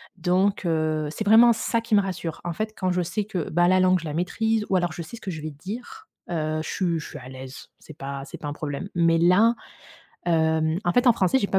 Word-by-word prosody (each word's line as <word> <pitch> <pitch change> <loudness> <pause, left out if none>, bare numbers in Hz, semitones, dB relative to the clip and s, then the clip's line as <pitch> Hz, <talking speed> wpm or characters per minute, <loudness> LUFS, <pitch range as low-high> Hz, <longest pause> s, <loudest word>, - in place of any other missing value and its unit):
Donc 185 +2 +1
heu, 155 -2 0
c'est 215 - -4
vraiment 230 +3 +7
ça 230 +1 0
qui 225 -2 +1
me 200 - +6
rassure. 180 -4 -4
En 170 - -2
fait, 215 +4 -3
quand 185 -1 +1
je 180 0 +1
sais 175 +5 -2
que, 185 -7 -4
bah, 175 +2 +3
la 185 0 +4
langue, 185 0 +4
je 165 - -9
la 150 - -4
maîtrise 220 +6 0
ou 190 - +3
alors 175 -2 -1
je 170 - -6
sais 175 +8 -9
ce - - -16
que 190 - -4
je 155 -2 -6
vais 155 0 -5
dire, 235 - -8 0.2
heu, 155 -2 -1
je - - -6
suis 170 -4 0
je - - -8
suis - - -8
à 125 - -11
l'aise. 130 0 -10
C'est 155 - -14
pas 140 0 -5
c'est - - -9
pas 150 - -7
un 145 - -3
problème. 150 +4 -5
Mais 165 -1 +3
là, 190 +8 +4 0.7
hem, 160 0 +2
en 175 - +2
fait, 245 +1 +2
en - - +8
français, 210 +6 +2
j'ai 200 - +1
pas 190 - +2
175 Hz, 265 wpm, -24 LUFS, 155-205 Hz, 0.7 s, en